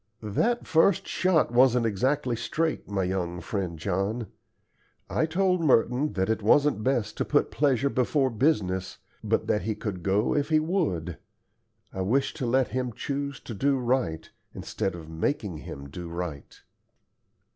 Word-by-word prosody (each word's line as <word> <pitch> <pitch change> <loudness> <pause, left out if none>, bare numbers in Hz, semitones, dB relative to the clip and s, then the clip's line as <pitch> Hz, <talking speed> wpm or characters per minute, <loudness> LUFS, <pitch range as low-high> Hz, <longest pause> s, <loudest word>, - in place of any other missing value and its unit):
"That 230 - 0
first 165 +2 +3
shot 185 -8 +2
wasn't 125 -1 +4
exactly 125 +4 0
straight, 155 +6 -2
my 100 -2 0
young 90 -1 -2
friend 90 -2 -3
John. 100 +7 -1 0.9
I 160 - +1
told 180 +1 +1
Merton 135 +1 +2
that 95 0 0
it 110 0 0
wasn't 140 +2 +3
best 125 -4 0
to - - +1
put - - +1
pleasure 140 -2 +2
before 135 +1 +1
business, 105 - 0 0.3
but - - 0
that 105 - +1
he 110 +3 -2
could 100 -5 -5
go 100 +5 +1
if 145 +1 0
he 155 -1 +4
would. 155 - -1 0.7
I 95 - -3
wished 125 +9 +1
to 125 - -2
let 130 +2 +2
him 125 -2 -2
choose 140 +3 -4
to 115 - -7
do 135 +6 +1
right, 120 -11 -1 0.3
instead 95 - -3
of 80 -2 -9
making 85 - -2
him 70 -2 -8
do 85 +4 -7
right." 85 -4 -6
115 Hz, 155 wpm, -27 LUFS, 95-140 Hz, 0.9 s, wasn't